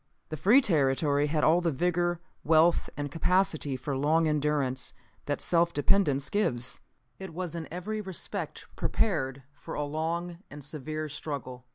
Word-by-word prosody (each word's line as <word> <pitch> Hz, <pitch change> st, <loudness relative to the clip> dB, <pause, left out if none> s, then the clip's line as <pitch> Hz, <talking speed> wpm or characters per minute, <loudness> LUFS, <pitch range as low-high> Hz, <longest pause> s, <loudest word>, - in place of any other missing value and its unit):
The 155 Hz, -, -3 dB
free 210 Hz, -, +5 dB
territory 145 Hz, -, +2 dB
had 150 Hz, +1 st, 0 dB
all 165 Hz, +3 st, +5 dB
the 170 Hz, -, +1 dB
vigor, 175 Hz, +3 st, 0 dB, 0.2 s
wealth 165 Hz, +2 st, +4 dB
and 145 Hz, -1 st, -3 dB
capacity 165 Hz, -4 st, +1 dB
for 135 Hz, +2 st, -3 dB
long 155 Hz, +4 st, +3 dB
endurance 145 Hz, -4 st, 0 dB, 0.3 s
that 145 Hz, -, -1 dB
self 170 Hz, 0 st, +2 dB
dependence 145 Hz, -4 st, +2 dB
gives. 130 Hz, -, 0 dB, 0.4 s
It 190 Hz, -4 st, -8 dB
was 180 Hz, -2 st, -4 dB
in 165 Hz, -2 st, -5 dB
every 210 Hz, +5 st, -3 dB
respect 190 Hz, -3 st, -5 dB
prepared 140 Hz, -, 0 dB
for 145 Hz, -, -8 dB
a 150 Hz, -, -1 dB
long 165 Hz, +3 st, -3 dB
and 145 Hz, 0 st, -9 dB
severe 155 Hz, +2 st, -4 dB
struggle. 140 Hz, -4 st, -6 dB
155 Hz, 150 wpm, -29 LUFS, 145-175 Hz, 0.4 s, free